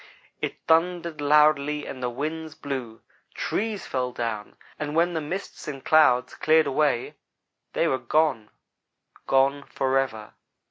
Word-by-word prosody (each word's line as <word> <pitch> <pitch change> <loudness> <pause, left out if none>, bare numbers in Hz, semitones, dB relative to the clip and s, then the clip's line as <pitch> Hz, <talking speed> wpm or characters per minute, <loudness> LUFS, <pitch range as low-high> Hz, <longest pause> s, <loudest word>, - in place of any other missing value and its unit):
"It - - -4
thundered 170 -1 +1
loudly 150 0 +3
and 130 - -7
the 125 - -1
winds 155 +5 -4
blew; 130 -6 -5 0.3
trees 210 -3 -2
fell 125 -1 -2
down; 115 -4 -4 0.2
and 150 0 -3
when 170 +2 +3
the 160 - -1
mists 180 +7 -6
and 135 -3 -6
clouds 150 -6 +4
cleared 155 0 +3
away, 140 -3 +1 0.6
they - - +2
were 130 - 0
gone 125 -3 +1 0.8
gone 135 +1 +3
forever. 130 -6 -1
145 Hz, 130 wpm, -25 LUFS, 130-155 Hz, 0.8 s, clouds